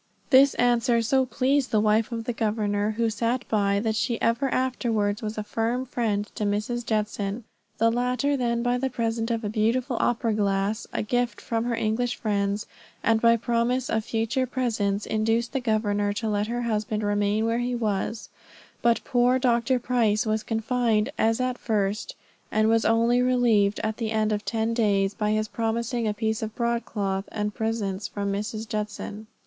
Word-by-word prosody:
This 270 +1 +6
answer 240 -1 +2
so 260 +3 +2
pleased 265 +1 +1
the 215 - +2
wife 215 +2 +2
of 230 -1 -3
the 245 - -3
governor, 210 -2 0
who 230 -1 +2
sat 230 +4 -1
by, 200 -2 +2
that 220 -1 0
she 235 +1 -1
ever 230 +4 +1
afterwards 230 -5 0
was 215 -1 -4
a 215 - -2
firm 230 +4 -1
friend 220 -5 -1
to - - -4
Mrs. 210 +4 -1
Judson. 210 0 -2 0.3
The 230 +1 +3
latter 250 +4 0
then 235 -2 0
by 245 0 +1
the 265 +1 0
present 230 -1 -2
of 230 -1 -1
a - - -1
beautiful 230 +4 0
opera 230 -2 +1
glass, 200 +1 0
a - - -2
gift 240 0 -1
from 230 0 -2
her 240 -1 0
English 230 +2 0
friends, 205 0 -1 0.4
and 225 -1 +3
by 230 0 +5
promises 240 +2 0
of 220 -1 +1
future 230 +4 -1
presents, 220 -6 -1
induced 225 +2 0
the 270 - +1
governor 205 -3 0
to 220 +2 -3
let 205 0 0
her 240 +1 -2
husband 215 -1 -1
remain 205 +1 +1
where 230 +1 +1
he 245 0 -1
was; 220 -1 -2 0.5
but 235 -1 +2
poor 245 0 +3
Dr. 250 0 +2
Price 235 -3 +1
was 215 0 0
confined 225 +1 0
as 225 +2 +2
at 255 -1 -1
first, 210 -2 -1 0.4
and 215 0 +2
was 225 0 +3
only 230 +2 +3
relieved 235 -5 +3
at 220 0 -2
the 225 -2 -2
end 215 -1 +1
of 210 0 -1
ten 225 0 -1
days, 200 -4 +2
by 210 0 -1
his 215 0 +1
promising 230 +2 -1
a 210 - 0
piece 220 0 -1
of 220 -1 -5
broadcloth, 210 -5 -1
and 210 -1 -2
presents 215 -3 -2
from 200 -1 -3
Mrs. 215 +2 -4
Judson. 210 0 -5
225 Hz, 180 wpm, -25 LUFS, 210-240 Hz, 0.5 s, This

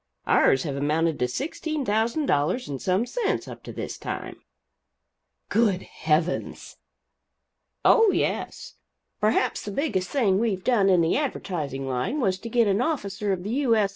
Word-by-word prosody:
Ours 135 - +4
have 145 -4 -3
amounted 155 +3 0
to 125 - +1
sixteen 300 - -3
thousand 225 +8 +1
dollars 150 - +1
and 135 -3 -5
some 190 +5 +1
cents 445 - -2
up - - -9
to - - -9
this - - -6
time." - - -6 1.1
"Good 205 -4 +2
heavens!" 160 +3 -2 1.1
"Oh, 450 -2 +6
yes. - - -2 0.4
Perhaps 215 +1 +1
the - - -5
biggest 195 - -1
thing 205 -9 +2
we've 205 -5 -1
done 210 -5 +3
in 180 -2 +5
the 165 - +2
advertising 155 - -3
line 130 - -1
was 190 -7 +1
to 230 - -7
get 235 0 +3
an 200 +3 +2
officer 205 -10 -1
of 180 -2 -2
the 205 - -4
U. 255 -2 +2
S. 210 -3 +2
200 Hz, 160 wpm, -25 LUFS, 165-245 Hz, 1.1 s, Oh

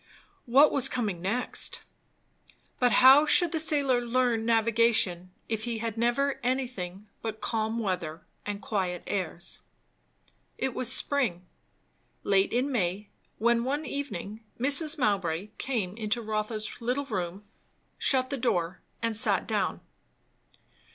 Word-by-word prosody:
What 275 +5 +6
was 270 -1 +5
coming 210 -9 -2
next? 220 +7 -1 1.0
But 245 -1 +3
how 270 +4 +7
should 340 +2 +5
the 320 - -1
sailor 280 -5 +2
learn 240 -2 +1
navigation, 225 -5 +2 0.2
if 220 0 -3
he 235 -1 -3
had 225 -1 -3
never 240 +5 0
anything 235 -7 -3
but 220 -1 -5
calm 220 0 -2
weather 180 -7 -3 0.2
and 205 0 -5
quiet 185 -4 -2
airs? 180 -2 -3 1.0
It 265 -2 -2
was 250 0 0
spring, 250 -10 +1 0.8
late 195 -1 +2
in 255 +4 0
May; 200 -3 -1 0.3
when 235 +1 +2
one 285 +5 -2
evening 220 -6 -5 0.2
Mrs. 295 +5 +4
Mowbray 195 - 0
came 210 -8 -2
into 220 +1 -2
Rotha's 215 0 -3
little 250 +4 -1
room, 190 -4 -4 0.6
shut 260 -1 +2
the 280 - -1
door, 180 -8 -1 0.2
and 230 -1 0
sat 210 - +1
down. - - -1
230 Hz, 125 wpm, -28 LUFS, 200-255 Hz, 1.0 s, how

